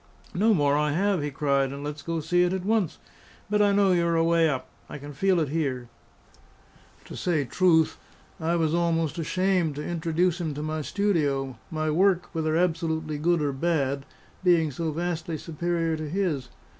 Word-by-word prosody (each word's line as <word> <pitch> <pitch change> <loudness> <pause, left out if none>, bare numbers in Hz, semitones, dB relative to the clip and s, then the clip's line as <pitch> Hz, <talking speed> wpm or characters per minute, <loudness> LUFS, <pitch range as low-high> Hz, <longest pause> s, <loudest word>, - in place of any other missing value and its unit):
"No 215 +5 +3
more 145 -3 +2
I 150 0 +1
have," 195 +1 +1
he 145 - -2
cried; 140 -2 0
"and 140 +1 -7
let's 150 0 -5
go 165 +2 -3
see 175 +3 +2
it 180 +1 +2
at 190 -1 -3
once! 215 -6 +1 0.5
But 210 0 +3
I 205 -1 +4
know 200 -1 +4
you 175 -1 +3
are 170 - +1
away 165 0 +3
up. 130 -3 -3 0.2
I - - -6
can 145 +1 -9
feel 185 +5 +2
it 155 -4 0
here." 135 -6 -2 1.2
To - - -9
say 160 -6 0
truth, 160 +2 +2 0.4
I 165 +2 0
was 160 -2 +1
almost 170 -2 0
ashamed 180 -1 0
to 150 - -5
introduce 170 +1 0
him 155 -4 -3
to 150 - -4
my 155 0 -2
studio 145 - 0
my 155 -1 -1
work, 180 +2 +2
whether 160 -1 0
absolutely 160 -3 -1
good 170 0 +2
or 140 -1 0
bad, 140 -2 -1 0.4
being 170 -4 +3
so 160 +4 -3
vastly 165 0 -3
superior 165 +1 -2
to 155 -1 -5
his. 160 -8 -1
160 Hz, 180 wpm, -26 LUFS, 150-175 Hz, 1.2 s, I